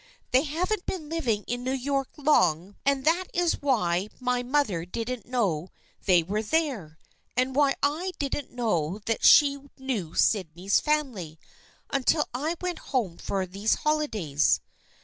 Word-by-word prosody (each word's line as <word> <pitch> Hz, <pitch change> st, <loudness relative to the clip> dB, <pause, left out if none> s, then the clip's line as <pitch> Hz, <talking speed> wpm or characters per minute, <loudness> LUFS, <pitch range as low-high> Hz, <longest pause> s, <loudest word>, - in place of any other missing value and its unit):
They 255 Hz, -, +5 dB
haven't 350 Hz, +7 st, -2 dB
been 315 Hz, -6 st, -4 dB
living 245 Hz, -11 st, -1 dB
in 245 Hz, +1 st, -3 dB
New 260 Hz, +1 st, -1 dB
York 275 Hz, 0 st, -1 dB
long 190 Hz, -, +2 dB
and 275 Hz, -1 st, +2 dB
that 340 Hz, +4 st, +3 dB
is 350 Hz, -1 st, +1 dB
why 205 Hz, -9 st, +1 dB
my 250 Hz, -1 st, 0 dB
mother 245 Hz, -, 0 dB
didn't 230 Hz, +5 st, -5 dB
know 190 Hz, -10 st, 0 dB, 0.4 s
they 180 Hz, -3 st, +5 dB
were 205 Hz, +6 st, -1 dB
there, 220 Hz, -, -1 dB, 0.4 s
and 255 Hz, +1 st, +1 dB
why 280 Hz, -1 st, +4 dB
I 325 Hz, +6 st, 0 dB
didn't 285 Hz, -1 st, -3 dB
know 205 Hz, -6 st, -1 dB
that 225 Hz, -, -1 dB
she 280 Hz, -1 st, +7 dB, 0.2 s
knew 240 Hz, -, -3 dB
Sydney's 185 Hz, -1 st, +2 dB
family, 250 Hz, -, -1 dB, 0.5 s
until 280 Hz, +3 st, +2 dB
I 300 Hz, +7 st, -1 dB
went 360 Hz, -1 st, -3 dB
home 215 Hz, -, -1 dB
for 195 Hz, -1 st, -2 dB
these 195 Hz, +4 st, 0 dB
holidays." 220 Hz, -, +1 dB
250 Hz, 145 wpm, -27 LUFS, 190-290 Hz, 0.5 s, she